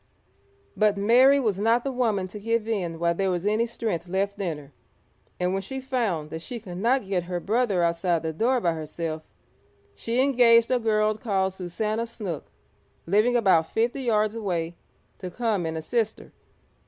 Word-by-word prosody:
But 210 -1 +2
Mary 250 +7 +5
was 215 -7 0
not 230 +3 +2
the 275 - -2
woman 220 -7 0
to 210 - -8
give 230 +1 -1
in 180 -7 -2
while 170 +1 +1
there 195 +2 0
was 180 0 -2
any 215 +3 +2
strength 210 -7 -3
left 200 +3 -2
in 170 -5 -2
her, 145 -1 -13 0.7
and 180 +1 0
when 195 - -1
she 265 +7 -6
found 230 - -2
that 160 - -5
she 240 +7 -6
could 180 -5 -8
not 240 +2 +2
get 185 -3 -1
her 175 0 -3
brother 205 -2 +1
outside 170 0 +1
the 160 0 -2
door 245 +9 +1
by 175 -7 +1
herself, 160 0 -5 0.7
she 230 - -2
engaged 240 -4 +5
a 250 - +3
girl 215 -1 +2
called 195 -4 -1
Susannah 210 +5 -3
Snook, 205 -9 -6 0.6
living 215 +7 +3
about 190 -8 +3
fifty 235 +4 0
yards 215 -4 +1
away, 175 -7 -3 0.4
to 185 - -5
come 210 -4 -1
and 160 0 -3
assist 220 +7 -1
her. - - -15
205 Hz, 180 wpm, -25 LUFS, 175-230 Hz, 0.7 s, Mary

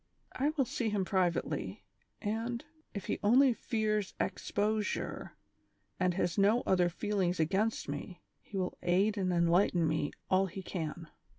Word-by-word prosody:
I 280 +3 +1
will 270 - +3
see 235 -1 -1
him 205 -3 0
privately, 175 - -1 0.4
and, 230 +5 -2 0.3
if 200 -3 -6
he - - -2
only 250 +5 +6
fears 215 -3 -1
exposure, 210 +1 -1 0.6
and 180 -2 +2
has 175 -1 0
no 210 +5 +4
other 180 -2 +3
feelings 185 -1 -1
against 195 +8 +1
me, 145 +5 -5 0.2
he 200 - -7
will 185 -1 -2
aid 190 +4 +2
and 190 -3 0
enlighten 170 0 +3
me 155 -2 0 0.2
all 190 +1 +3
he 190 +1 -7
can." 165 -2 -4
190 Hz, 140 wpm, -32 LUFS, 175-215 Hz, 0.6 s, only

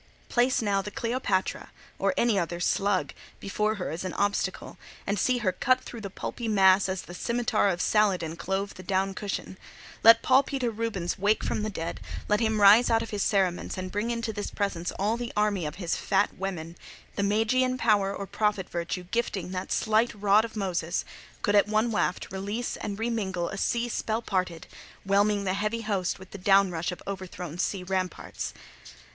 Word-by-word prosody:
Place 245 0 +2
now 200 -2 +1
the 210 - -6
Cleopatra, 230 -4 -1 0.3
or - - +1
any 230 -4 +3
other 175 0 -3
slug, 195 +2 +1 0.3
before 210 +2 -1
her 180 -7 -4
as 165 +4 -4
an 185 - -4
obstacle, 200 +1 -1 0.3
and 200 0 -1
see 255 +5 +2
her 185 - +4
cut 255 +7 +2
through 235 - -9
the 200 - -5
pulpy 230 +4 -5
mass 195 -2 +5
as 190 -1 -3
the 175 - -10
scimitar 235 +1 +1
of 175 -2 -1
Saladin 185 -7 +2
clove 195 +3 -2
the - - -10
down 190 +1 0
cushion. 190 -1 -5 0.4
Let 230 +1 +8
Paul 260 +1 +6
Peter 265 -4 -2
Rubens 210 -6 -3
wake 205 +3 +2
from - - -1
the 215 - -1
dead, 165 -5 -4 0.3
let 210 0 +2
him 220 -2 +1
rise 210 +4 +8
out 225 -1 +3
of - - -8
his 205 -1 -2
cerements, 190 -4 +1
and 185 0 -4
bring 210 +3 -1
into 230 -1 -2
this 205 -1 -4
presence 190 -4 -2
all 210 +4 0
the 240 -1 -4
army 205 -6 +1
of 150 - -6
his 175 -3 -2
fat 200 +1 +1
women; 175 -3 -5 0.4
the - - -1
magian 230 +5 +2
power 210 -5 +3
or 200 - -5
prophet 210 -2 0
virtue 170 +1 -3
gifting 190 -2 -2
that 185 0 -4
slight 220 +1 +2
rod 205 +1 +5
of 225 -1 -7
Moses, 180 -4 -1 0.4
could, 205 - +2
at 205 0 +5
one 215 +2 +1
waft, 190 -4 -1
release 205 +5 -3
and 200 -1 -5
re 230 +2 -1
mingle 190 -6 -2
a 195 - -6
sea 235 +3 0
spell 225 -1 -2
parted, 180 -5 -2 0.4
whelming 200 +1 +3
the 185 -1 0
heavy 210 +3 -1
host 200 -5 -1
with 190 0 -14
the 200 - -8
down 195 0 +4
rush 165 0 -2
of 180 - -8
overthrown 180 -3 -6
sea 190 0 -1
ramparts. 185 -1 -3
200 Hz, 190 wpm, -27 LUFS, 185-220 Hz, 0.4 s, Let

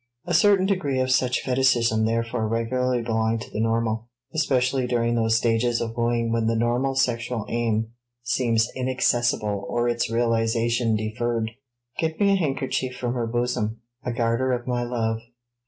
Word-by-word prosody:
A 175 - -2
certain 195 +2 +5
degree 180 -9 0
of 130 0 +1
such 125 -1 +2
fetichism 120 -4 +2
therefore 115 0 -1
regularly 120 +2 0
belong 110 0 0
to 110 - -8
the - - -4
normal, 115 0 0 0.3
especially 130 -4 +1
during 120 -1 +1
those 115 -1 +2
stages 115 +1 +1
of 115 -1 -4
wooing 115 -1 0
when 115 -1 +1
the 115 - +1
normal 120 +4 +1
sexual 120 -3 0
aim 115 -1 0 0.3
seems 115 -1 +1
inaccessible 120 -5 0
or 120 0 0
its 120 -1 0
realization 115 0 +1
deferred. 110 +1 -2 0.5
"Get 160 -1 -1
me 200 -1 +4
a - - +4
handkerchief 135 -6 -1
from 120 -1 -2
her 120 -2 -2
bosom 115 -2 -1 0.2
a 125 - -2
garter 120 +2 +1
of 120 -1 -3
my 125 -1 -1
love." 115 -2 -1
120 Hz, 155 wpm, -24 LUFS, 115-125 Hz, 0.5 s, certain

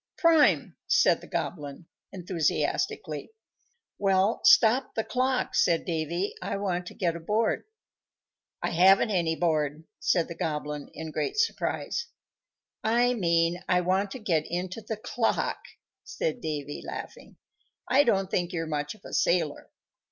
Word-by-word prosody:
"Prime!" 330 -3 +4
said - - +4
the - - -12
Goblin, 150 -1 -4 0.3
enthusiastically. 175 -4 -2 0.7
"Well, 195 +1 +2
stop 235 +4 +5
the 225 - 0
clock," 255 +1 0
said 170 -2 +2
Davy; 170 +3 -2
"I - - -3
want 180 -3 -2
to - - -9
get 170 -5 0
aboard." 210 +7 0 1.0
"I - - 0
haven't 190 +5 +5
any 170 -4 +1
board," 155 -3 0 0.2
said 170 -2 +1
the 170 - -6
Goblin, 150 -2 -4
in 160 -1 -6
great 405 - -2
surprise. 460 +1 -1 0.8
"I 240 +3 +3
mean 170 -4 +1
I 180 -1 +4
want 190 +3 +1
to 260 - -7
get 165 -8 0
into 180 +5 -4
the 220 0 -5
clock," 225 +2 -1 0.4
said 485 - -3
Davy, 145 -3 -4
laughing. - - -8 0.5
"I 265 +4 +5
don't 195 -6 +1
think 175 -1 -1
you're 165 -1 -2
much 150 +2 -3
of - - -21
a - - -9
sailor." 170 -4 +1
180 Hz, 135 wpm, -27 LUFS, 165-220 Hz, 1.0 s, stop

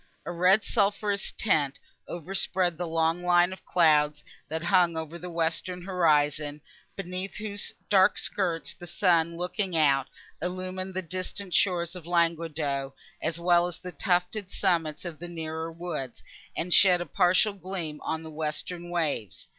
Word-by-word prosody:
A - - -3
red 180 +4 +4
sulphureous 205 -1 0
tint 150 -10 +1 0.3
overspread 180 0 -1
the 175 +1 -3
long 165 +1 +1
line 175 +1 +4
of 190 - -12
clouds, 150 -3 +3 0.3
that 160 +1 -3
hung 175 -3 +3
above 160 +1 -6
the 180 - -6
western 170 +2 -2
horizon, 150 -5 +2 0.4
beneath 185 0 -4
whose 205 -1 -2 0.2
dark 195 0 +5
skirts 175 -5 -1
the 175 - -11
sun 170 -2 +2
looking 180 0 -2
out, 140 -3 +3 0.3
illumined 185 +1 -4
the 190 - -2
distant 185 +2 -5
shores 175 -2 +2
of 175 -2 -9
Languedoc, 160 -5 0 0.3
as 165 +1 -1
well 175 0 +4
as 175 - -5
the 180 - -8
tufted 180 +3 0
summits 165 -6 0
of 170 -3 -6
the 175 +1 -6
nearer 160 -1 -4
woods, 160 -7 -5 0.3
and 175 +1 0
shed 180 -3 +6
a 175 - -3
partial 185 +5 +3
gleam 180 -6 -6
on 160 0 -3
the 160 - -8
western 160 +3 -4
waves. 150 - -2
175 Hz, 150 wpm, -28 LUFS, 160-185 Hz, 0.4 s, shed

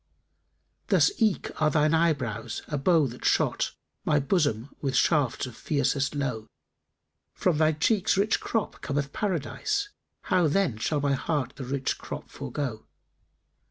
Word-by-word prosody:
Thus - - +4
eke 220 -4 +1
are 155 - +5
thine 150 0 +2
eyebrows 140 -10 0
a 150 - -3
bow 160 +1 +4
that 125 -1 -7
shot - - +1
* - - -53
My 150 - +3
bosom 145 - 0
with 135 -2 -1
shafts 145 -8 +2
of 125 -3 -9
fiercest 140 +1 0
lowe: 125 -6 -2 0.9
From 170 -5 +1
thy 155 0 +4
cheeks' 195 +7 +2
rich 205 +2 +2
crop 225 -3 -2
cometh 140 -1 -2
Paradise; 220 - -1 0.2
* - - -53
How, 180 -3 +4
then, 155 - +1
shall 145 +5 0
my 140 -1 +2
heart 140 -1 -1
the 135 - -6
rich 135 +1 -2
crop - - -7
forego? 125 -7 -5
150 Hz, 150 wpm, -27 LUFS, 135-170 Hz, 0.9 s, are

